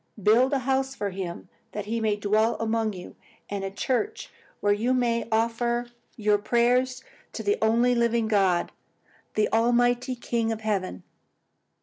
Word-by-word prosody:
Build 240 +6 +5
a 280 - +2
house 265 0 0
for 205 -5 -3
him 180 -2 -6 0.3
that 210 -1 -4
he 230 +2 -2
may 215 -2 +1
dwell 215 +3 +1
among 225 -1 0
you, 180 -1 -10 0.4
and 200 -1 -3
a 195 - -2
church 270 - -2 0.3
where 205 0 +3
you 235 +5 +1
may 235 -2 0
offer 235 +2 0 0.2
your 210 -2 +2
prayers 250 +4 +1 0.3
to - - -5
the 415 +1 +1
only 235 +3 +3
living 235 -1 +1
God, 195 -5 +2 0.6
the 215 - +3
Almighty 245 +2 +2
King 235 -1 -1
of 220 -1 -4
Heaven.'" 195 - -2
230 Hz, 150 wpm, -26 LUFS, 210-245 Hz, 0.6 s, Build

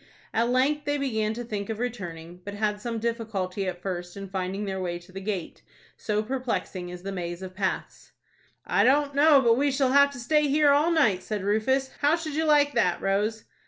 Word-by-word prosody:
At 230 +2 +2
length 275 +4 +1
they 290 0 0
began 220 -6 -1
to 240 - -4
think 210 -2 -5
of 220 - -3
returning, 180 -8 -6
but 205 +1 -6
had 210 0 -1
some 230 0 -3
difficulty 215 -5 -2
at 180 -1 -5
first 175 -1 -5
in 195 -1 -7
finding 190 +2 -3
their 190 -1 -3
way 175 -1 -2
to 175 +1 -16
the 195 +1 -7
gate, 195 -4 -4 0.3
so 210 0 -1
perplexing 230 -7 -3
is 180 0 -9
the 195 - -4
maze 175 -1 -5
of 185 0 -7
paths. 190 0 -4 0.5
"I - - +2
don't 285 +2 +3
know 290 0 +6
but 230 -2 +4
we 285 +2 +2
shall 270 -1 +1
have 280 +1 +6
to 260 - -8
stay 300 +5 +2
here 290 +1 +4
all 295 +4 +4
night," 225 - +3
said 210 -3 -4
Rufus. 260 +7 +1
"How 295 +2 +4
should 325 -3 -5
you 320 +2 0
like 290 -1 +4
that, 180 - +2
Rose?" 210 +3 0
220 Hz, 210 wpm, -26 LUFS, 190-275 Hz, 0.5 s, know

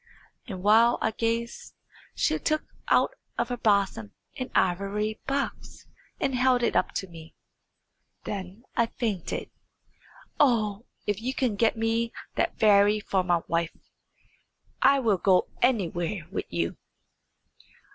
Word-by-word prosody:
And 185 -2 -6
while 225 +3 +5
I 220 - 0
gazed 230 +1 -3 0.4
she - - +1
took 310 0 0 0.2
out - - +3 0.2
of 235 +1 0
her 245 - -2
bosom 200 - +1 0.2
an 255 - -4
ivory 200 +4 0
box, 275 0 -3 0.3
and 270 - 0
held 250 -1 +3
it - - +1
up - - +1
to 190 - -3
me. 165 -2 -13 0.9
Then 195 +2 -6
I 235 - +3
fainted. 215 -8 -3 0.9
Oh! 225 -5 +2 0.2
if 205 0 -1
you 260 +3 -2
can 245 -6 0
get 225 +2 +2
me 225 +1 0 0.2
that - - -1
fairy 210 -1 +5
for 195 -2 0
my 175 -2 +1
wife, 170 0 -1 1.0
I 275 +2 +6
will 220 -8 +2
go 185 -2 +3
anywhere 190 -7 0
with - - -3
you." 85 -1 -2
215 Hz, 130 wpm, -27 LUFS, 190-235 Hz, 1.0 s, I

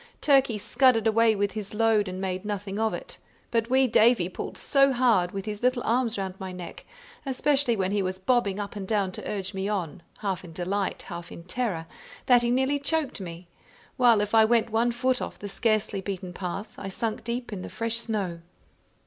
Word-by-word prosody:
Turkey 270 -6 +4
scudded 230 +2 +3
away 225 0 +4
with 200 0 0
his 210 0 -6
load, 220 -2 +3
and 185 0 -5
made 185 -1 -3
nothing 205 -1 -4
of 220 0 +2
it; - - -7 0.3
but 230 0 +1
wee 265 +1 +4
Davie 225 -6 +4
pulled - - -6
so 275 -1 +3
hard 235 -8 +3
with 195 0 -5
his 210 -1 -5
little 250 0 +2
arms 235 -1 +1
round 190 -1 -3
my 190 -1 -5
neck, 180 -1 -9 0.4
especially 270 -2 +1
when 190 -2 0
he 205 0 +1
was 185 0 -2
bobbing 200 -1 +1
up 205 0 -5
and 195 -2 -5
down 200 -3 +1
to - - -6
urge 200 -1 -3
me 195 +1 -2
on, 185 -5 -3 0.2
half 190 -3 -2
in 170 -2 -11
delight, 190 +3 -2
half 170 -2 -8
in 170 - -9
terror, 185 -4 -2 0.4
that 245 -2 +6
he 240 - 0
nearly 265 +3 +2
choked 285 -5 -1
me; 170 -1 -8 0.5
while 235 -4 +5
if 210 +1 -3
I 220 -1 +7
went 230 0 +2
one 230 +2 +2
foot 255 +1 0
off - - -5
the 205 - -7
scarcely 215 -2 0
beaten 185 -2 -5
path, 195 +4 -5
I 195 - -5
sunk 220 +2 -3
deep 235 -1 -4
in 190 - -5
the - - -7
fresh 230 0 -2
snow. 205 -7 -2
215 Hz, 205 wpm, -27 LUFS, 190-240 Hz, 0.5 s, I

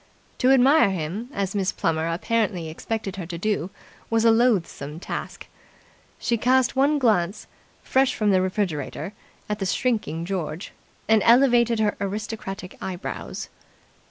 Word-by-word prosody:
To 255 - +3
admire 270 0 +6
him, 190 +6 -4
as 195 -4 -2
Miss 195 -2 0
Plummer 160 0 -1
apparently 185 -2 -1
expected 195 +4 -4
her 180 -4 -5
to 170 -1 -5
do, 195 -1 -1 0.4
was 225 0 +2
a 230 - +7
loathsome 200 - +1
task. - - -6 0.7
She 235 - 0
cast 255 +2 +3
one 280 +3 +3
glance, 210 -7 +1 0.4
fresh 265 0 +2
from 210 -2 +2
the 185 -1 +4
refrigerator, 185 -2 -2 0.3
at 210 0 -3
the 195 - -1
shrinking 210 -9 -1
George, 175 -3 -4 0.4
and 220 -1 +4
elevated 235 -1 +5
her 210 -1 +1
aristocratic 200 -2 -5
eyebrows. 185 -1 -5
210 Hz, 135 wpm, -24 LUFS, 180-235 Hz, 0.7 s, a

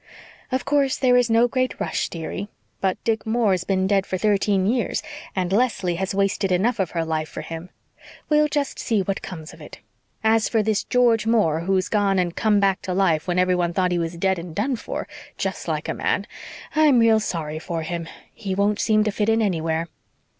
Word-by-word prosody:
"Of 260 0 -1
course 280 -2 +2
there 255 -2 +3
is 245 -1 +3
no 230 +2 +4
great 255 +1 -1
rush, - - -1
dearie. 170 +4 -5 0.3
But 190 -1 0
Dick 225 -1 0
Moore's 220 -5 +1
been 190 -1 0
dead 195 0 +1
for 185 - -2
thirteen 200 -1 +2
years 235 +4 0 0.3
and 185 -1 -1
Leslie 210 -6 +1
has 190 +1 -2
wasted 195 -1 +1
enough 215 +6 +1
of 190 -4 0
her 165 - +1
life 155 -1 -2
for - - -6
him. 165 +2 -7 0.6
We'll 300 0 +4
just 290 -2 -2
see 220 -4 +1
what 195 +1 -2
comes 160 -4 -8
of - - -15
it. - - -11 0.4
As 220 0 +3
for 225 -2 +2
this 215 -1 0
George 235 -3 +3
Moore, 210 -9 +3
who's 185 +2 0
gone 200 -2 +1
and 175 -2 0
come 215 -2 +2
back 195 -1 +2
to 185 -2 -3
life 170 -5 +2
when 175 0 0
everyone 180 -1 +2
thought 180 0 +1
he 175 - +1
was 165 0 -3
dead 190 +1 +1
and 170 -1 -8
done 250 +7 0
for, - - -5 0.3
just - - -3
like - - -2
a - - -1
man, - - -1 0.5
I'm 305 -4 +5
real 225 -1 +5
sorry 160 -6 -3
for 165 -1 -4
him. 170 0 -4 0.3
He 190 -2 -4
won't 205 +1 +1
seem 215 -1 +3
to 210 - 0
fit 210 +1 0
in 225 0 +3
anywhere." 165 -5 0
195 Hz, 205 wpm, -23 LUFS, 180-225 Hz, 0.6 s, I'm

